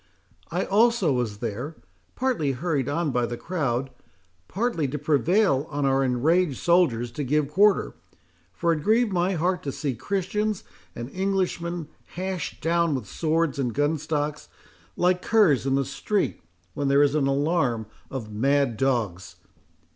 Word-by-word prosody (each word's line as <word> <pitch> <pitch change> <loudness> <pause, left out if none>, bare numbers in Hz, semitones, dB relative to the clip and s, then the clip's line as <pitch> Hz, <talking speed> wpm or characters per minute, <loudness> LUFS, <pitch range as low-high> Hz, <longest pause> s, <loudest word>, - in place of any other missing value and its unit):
I - - -1
also 210 - +3
was 120 -5 -2
there, 120 +8 -4 0.4
partly 235 - 0
hurried 145 -1 -1
on 155 0 0
by 125 -1 0
the 120 - -5
crowd, 135 -7 -2 0.6
partly 195 - -1
to 140 +3 -3
prevail 155 +1 +2
on 145 -2 -1
our 135 0 +3
enraged 140 +4 +2
soldiers 140 -10 +2
to 145 +4 -4
give 145 +2 0
quarter; 200 +4 +3 0.6
for 170 -1 +1
it 155 - -3
grieved 220 +4 +2
my 180 +2 +1
heart 180 +2 0
to 140 - -3
see 140 0 -2
Christians 200 - -2 0.3
and 120 - -5
Englishmen 180 -4 -1 0.3
hashed 185 -3 -4
down 170 -1 +2
with 125 -5 -4
swords 160 - 0
and 125 -4 -1
gunstocks, 150 0 -1 0.5
like 180 0 +2
curs 175 - +3
in 135 - +2
the 135 0 +1
street, 195 +9 -1 0.3
when 140 +5 -2
there 140 +1 +5
is 145 -1 +2
an 150 -3 +2
alarm 135 -5 +1 0.2
of 115 -5 -6
mad 135 +1 +1
dogs. 115 -9 -1
150 Hz, 145 wpm, -25 LUFS, 135-180 Hz, 0.6 s, there